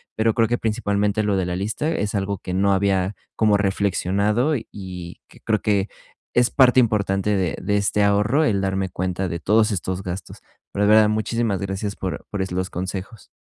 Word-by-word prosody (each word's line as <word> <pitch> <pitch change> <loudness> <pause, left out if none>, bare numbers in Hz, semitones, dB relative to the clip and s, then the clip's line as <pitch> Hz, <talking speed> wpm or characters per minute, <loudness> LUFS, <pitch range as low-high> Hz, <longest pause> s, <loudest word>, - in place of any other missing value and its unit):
pero 110 0 +2
creo 115 -2 +2
que 120 - +1
principalmente 105 -2 0
lo 105 -1 +1
de 95 - 0
la 90 0 -2
lista, 110 - -2
es 105 -9 -2
algo 100 0 -1
que 90 - -6
no 100 +1 +2
había 95 0 +1 0.2
como 105 -2 +4
reflexionado, 100 - +1
y 115 - -9
y 90 -3 -8
que - - -18
creo 110 -1 0
que, 100 -1 +1 0.5
es 120 0 +4
parte 130 -1 +5
importante 100 -3 0
de 90 -3 -1
de 105 0 0
este 100 0 +1
ahorro 105 +9 +3
el 100 -7 +1
darme 95 -1 -1
cuenta 95 +1 -2
de 85 - -4
todos 105 +5 +3
estos 95 0 -3
gastos. 90 0 -6 0.4
Pero 100 +1 +1
de - - +3
verdad, 110 0 +6
muchísimas 110 -1 -1
gracias 100 +1 -3
por 95 -2 -4
por 100 - -2
es 95 - -3
los 90 +1 -2
consejos. 95 +4 -6
100 Hz, 195 wpm, -22 LUFS, 95-110 Hz, 0.5 s, verdad